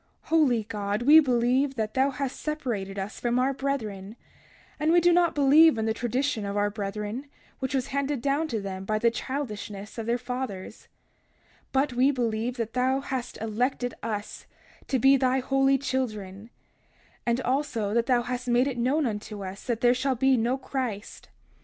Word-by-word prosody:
31:16 - - -26
Holy 280 -9 +3
God, 205 0 -3
we 300 +5 +9
believe 260 0 +2
that 215 -2 -2
thou 265 +1 +3
hast 270 -1 -4
separated 235 -11 -3
us 195 +2 -5
from 240 0 0
our 260 +2 +2
brethren; 220 -8 -4 0.6
and 310 +2 +2
we 345 - +6
do 350 +1 +4
not 345 -1 +3
believe 290 +1 +6
in 220 - -1
the 220 - +1
tradition 245 0 -1
of 200 0 -3
our 205 0 +1
brethren, 210 +5 -4 0.3
which 265 0 -2
was 260 -2 -1
handed 280 0 -1
down 285 +5 0
to 230 -7 -2
them 190 -1 -5
by 215 +2 -1
the 235 +2 +3
childishness 215 -5 -5
of 225 - -5
their 235 +1 +2
fathers; 245 -6 -6 0.8
but 270 0 +1
we 255 +3 +4
believe 240 -2 -1
that 230 -1 -3
thou 260 +1 +1
hast 265 -3 -5
elected 245 +3 -1
us 210 -2 -5 0.4
to 270 - +1
be 270 +3 +5
thy 260 0 +2
holy 270 +1 +2
children; 215 -6 -4 0.7
and 235 +1 +1
also 255 -6 -1
thou 240 0 +1
hast 250 +1 -4
made 245 +1 +3
it 265 -3 -3
known 275 +6 +1
unto 210 -2 -4
us 190 +2 -8
that 235 -2 -1
there 245 0 +5
shall 260 +1 0
be 265 +2 +3
no 240 +2 +1
Christ. 255 -6 -5
245 Hz, 175 wpm, -27 LUFS, 220-270 Hz, 0.8 s, we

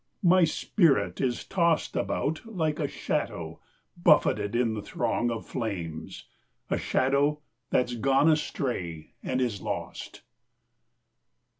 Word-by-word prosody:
My 180 0 +6
spirit 165 -1 +2
is 125 -3 0
tossedAbout 165 -3 0
like 160 -9 -2
a - - 0
shadow - - -3 0.4
buffeted 120 -11 +3
in 120 -2 +2
the 105 - -4
throngOf 120 +2 -1
flames, 85 -9 -5 0.5
a - - +1
shadow 140 +3 +2 0.3
that's 125 -1 +1
gone 135 +5 +3
astray, 120 - -1
and 130 - -1
is 120 -6 -1
lost. - - -5
130 Hz, 105 wpm, -28 LUFS, 110-155 Hz, 0.5 s, My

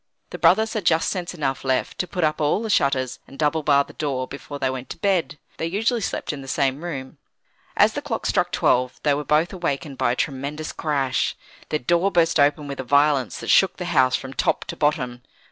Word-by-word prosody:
The - - -6
brothers 220 +4 +4
had 215 -4 -2
just 165 -1 +3
sense 180 -1 -4
enough 135 -5 -2
left 130 -1 -1
to 180 - -1
put 180 -3 -3
up 155 0 +1
all 150 +9 +1
the 220 - -2
shutters, 135 -6 +1
and 135 - -13
double 155 +1 +1
bar 140 -1 +4
the - - -15
door, 135 -4 -2
before 145 +1 -8
they 135 - 0
went 130 0 -6
to - - -7
bed. 185 -6 0 0.2
They 165 - -2
usually 225 +6 0
slept 175 - -3
in 140 - -7
the 135 - -10
same 140 +2 0
room. 135 -6 -6 0.6
As - - +5
the - - -3
clock - - -4
struck - - +1
twelve, 125 0 +1
they 145 - +3
were 145 +1 -2
both 155 +6 +1
awakened 145 -6 -3
by 120 - +2
a - - -3
tremendous 145 +3 -3
crash. 135 -6 0 0.3
Their 155 - +1
door 170 +7 +2
burst 170 -2 +3
open 145 +1 +3
with 140 -1 -6
a - - -2
violence 140 0 +2
that - - 0
shook 190 - +4
the 180 - -4
house 130 -3 +4
from 135 +1 -5
top - - 0
to - - -6
bottom. 125 -5 0
145 Hz, 225 wpm, -23 LUFS, 135-170 Hz, 0.6 s, As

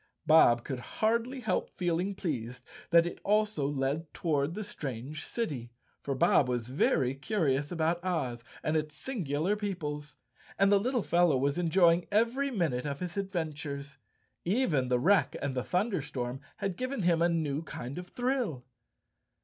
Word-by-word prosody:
Bob 155 -7 +6
could 130 -3 -4
hardly 235 - -1
help 220 - 0
feeling 180 +2 -1
pleased 125 -8 -4 0.2
that 170 0 +6
it 175 - -5
also 210 -8 +2
led 145 +3 -2
toward 155 -1 0
the 215 - -3
strange 140 - -5
city, 145 - -3 0.3
for 140 - -2
Bob 130 0 +4
was 120 -1 -2
very 130 -1 +2
curious 145 -3 0
about 170 +1 0
Oz 135 -10 -2 0.2
and 155 - 0
its 150 -1 -1
singular 175 - -1
peoples, 150 -8 -4 0.4
and 195 +1 +4
the 200 - +6
little 245 +1 0
fellow 170 -4 +3
was 140 +5 0
enjoying 170 0 +4
every 235 +6 +2
minute 155 - -1
of 140 -1 -3
his 180 -1 -5
adventures. 155 -7 -4 0.4
Even 175 - +1
the 125 0 +2
wreck 185 +9 +3
and 140 -1 -2
the 125 - -1
thunderstorm 145 - -2 0.2
had 195 -3 -3
given 255 -4 -2
him 170 -1 +3
a 170 - +4
new 155 -3 0
kind 140 -2 -6
of 180 - -8
thrill. 245 - -1
160 Hz, 155 wpm, -30 LUFS, 140-195 Hz, 0.4 s, Bob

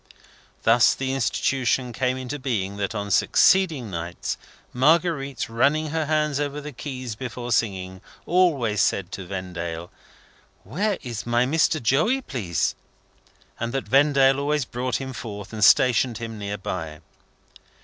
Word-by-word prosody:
Thus 115 +2 +5
the 135 0 -2
Institution 125 +2 0
came 130 +1 0
into 130 +3 -5
being 100 -7 -2
that 100 +2 -3
on 100 -1 -3
succeeding 155 - +3
nights, 85 0 -4 0.4
Marguerite, 140 -3 +2
running 145 +7 +1
her 160 -1 -1
hands 150 -2 +1
over 145 0 -2
the 150 +1 -7
keys 130 -2 -6
before 120 +1 -6
singing, 95 -5 -1 0.2
always 145 - +2
said 95 -1 0
to 95 -2 -7
Vendale, 85 -3 -5 0.7
"Where 190 - -1
is 120 -3 -6
my 120 +1 +2
Mr. 155 +3 +2
Joey, 155 - +2
please?" 95 - -1 0.9
and 115 0 -2
that 135 - -2
Vendale 135 -1 +4
always 145 -1 0
brought 125 +1 -3
him 130 -1 -4
forth, 105 -4 -7
and 105 -1 -2
stationed 120 0 +5
him 115 -2 -6
near 100 0 -4
by. 80 -5 -5
125 Hz, 140 wpm, -24 LUFS, 105-140 Hz, 0.9 s, Thus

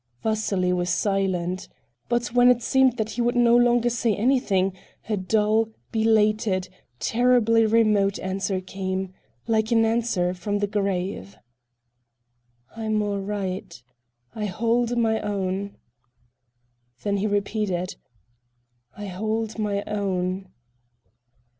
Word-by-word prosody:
Vasily 205 -4 0
was 180 0 -1
silent. 185 -1 -1 0.4
But 240 0 0
when 245 0 +6
it 245 -1 +3
seemed 265 -2 +3
that 220 -1 -2
he 235 +3 -2
would 240 +1 +1
no 240 -1 +5
longer 240 0 +4
say 230 -2 +1
anything, 205 -6 +1 0.3
a 215 - 0
dull, 215 +3 +1 0.2
belated, 215 -3 +2 0.3
terribly 230 -2 +3
remote 210 -3 +3
answer 190 0 -2
came—like 190 +4 -3
an 225 -1 +4
answer 220 -6 0
from 205 +3 -2
the 205 - 0
grave: 195 - -3 1.4
"I'm 220 -1 -1
all 205 -1 -2
right. 195 -3 -4 0.5
I 215 -1 -3
hold 235 +4 0
my 220 -1 +2
own." 200 -1 -3 1.3
Then 200 -1 0
he 205 +2 0
repeated: 200 -3 -1 1.0
"I 205 - -6
hold 220 +4 -3
my 205 -1 -1
own." 190 -2 -2
210 Hz, 110 wpm, -24 LUFS, 190-225 Hz, 1.4 s, when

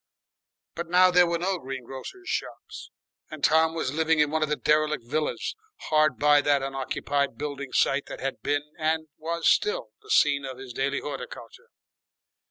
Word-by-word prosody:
But 170 0 -5
now 180 +1 +6
there 180 0 +5
were 170 0 0
no 185 +2 -1
green 130 -2 -6
grocer's 135 - -9
shops, - - -5 0.4
and 155 -2 -9
Tom 160 +1 +4
was 145 -5 -2
living 160 +1 +2
in 150 -1 +3
one 160 0 0
of 155 - +1
the 150 - +1
derelict 150 -3 +1
villas 150 +5 -2 0.4
hard 155 -3 +3
by 145 0 +5
that 145 -2 +2
unoccupied 135 +1 -2
building 140 -2 -5
site 140 +1 +2
that - - -8
had 135 - -4
been 145 0 0 0.2
and 160 0 0
was 165 +1 -2
still 455 +5 +2
the 425 - -19
scene 145 - +4
of 130 -2 -6
his 130 -2 -9
daily 140 +3 -1
horticulture. 125 -5 -8
150 Hz, 175 wpm, -26 LUFS, 140-160 Hz, 0.4 s, now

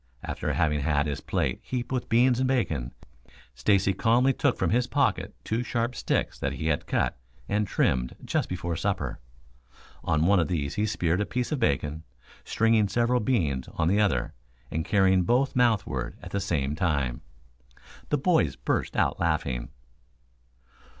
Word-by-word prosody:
After - - -3
having 75 -2 +1
had 75 0 +1
his 75 -2 -3
plate - - -1
heaped 125 -1 -4
with 125 -2 -2
beans 120 +2 +4
and 130 - +2
bacon, 80 - 0 0.6
Stacy 95 +10 +2
calmly 120 +7 +3
took 140 -2 +1
from - - 0
his 120 +2 +2
pocket - - 0
two 110 +2 -1
sharp 120 0 -1
sticks - - -1
that 70 0 -2
he 80 +4 -2
had 75 - -1
cut 65 - 0 0.3
and 105 0 0
trimmed 60 -7 0
just - - -1
before 85 -2 -3
supper. - - -2 0.8
On 75 +1 +1
one 100 +1 +4
of 85 - +1
these 70 -5 -2
he 105 +1 0
speared 90 -3 0
a - - 0
piece 125 +2 -2
of 150 - -1
bacon, 75 - 0 0.4
stringing 115 -2 +2
several 120 +5 +1
beans 80 - 0
on 80 - +1
the 100 +4 +3
other, 70 -13 +1 0.4
and 80 - -1
carrying 95 0 +3
both 125 +8 +1
mouthward 120 -5 +1
at - - -8
the 100 - -1
same 75 -8 -1
time. 70 -7 -1 0.9
The 150 - +2
boys 135 - +2
burst - - -2
out - - +1
laughing. 75 -8 -1
95 Hz, 165 wpm, -27 LUFS, 75-120 Hz, 0.9 s, beans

